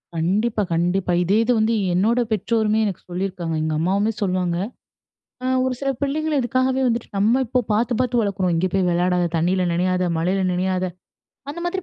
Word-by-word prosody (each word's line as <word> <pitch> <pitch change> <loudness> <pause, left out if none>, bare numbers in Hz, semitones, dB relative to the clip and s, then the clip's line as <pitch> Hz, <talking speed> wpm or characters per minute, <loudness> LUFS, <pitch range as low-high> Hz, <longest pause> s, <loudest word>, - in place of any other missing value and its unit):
கண்டிப்பா, 210 +7 0
கண்டிப்பா. 180 +2 0
இதே 195 +4 +2
இது 240 - +1
வந்து 220 +1 +2 0.2
என்னோட 215 +7 +2
பெற்றோருமே 220 +1 +1
எனக்கு 195 -4 -3
சொல்லியிருக்காங்க. 175 -2 -3
எங்க 155 0 -1
அம்மாவுமே 200 +6 +1
சொல்லுவாங்க. 180 -3 0 0.9
அ - - -2 0.2
ஒரு 260 -1 0
சில 275 -1 0
பிள்ளைங்கள் 300 +2 0
இதுக்காகவே 255 +2 +1
வந்துட்டு 235 -1 -1
நம்ம 225 +6 +3
இப்போ 250 +2 +1
பார்த்து, 230 +4 +1
பார்த்து 250 -1 +1
வளர்க்குறோம். 195 -4 0
இங்கே 175 +3 +1
போய் 190 -2 +1
விளையாடாத! 175 0 +1
தண்ணில 180 +3 +1
நினையாத! 185 +1 +1
மழையில 185 +4 0
நினயாத! 185 +1 0 0.7
அந்த 330 +4 -7
மாதிரி 375 +2 -2
195 Hz, 160 wpm, -22 LUFS, 180-235 Hz, 0.9 s, நம்ம